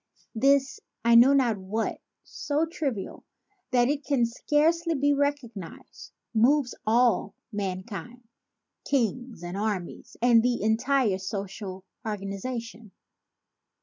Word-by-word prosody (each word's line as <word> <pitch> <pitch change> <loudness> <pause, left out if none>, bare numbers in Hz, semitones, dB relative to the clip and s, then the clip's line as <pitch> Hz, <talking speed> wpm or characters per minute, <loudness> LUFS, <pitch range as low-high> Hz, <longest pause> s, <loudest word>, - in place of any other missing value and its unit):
This 270 +3 +2 0.3
'I 235 - +5
know 240 +4 +8
not 245 -6 +3
what* 205 +4 -3 0.2
so 295 +2 -1
trivial 275 - -4 0.5
that 245 -2 +3
it 290 +1 -1
can 270 -5 +2
scarcely 320 +7 +1
be 285 +1 +2
recognized, 280 - -4 0.2
moves 250 +3 +3
all 230 -3 +2 0.2
mankind, 205 +4 -5 0.6
kings 245 -5 -1
and 175 +1 -5
armies 200 -4 -4
and 235 -1 +5
the 240 -2 0
entire 220 -1 +2
social 195 0 -6 0.2
organization. 215 +1 -5
235 Hz, 105 wpm, -27 LUFS, 205-275 Hz, 0.6 s, know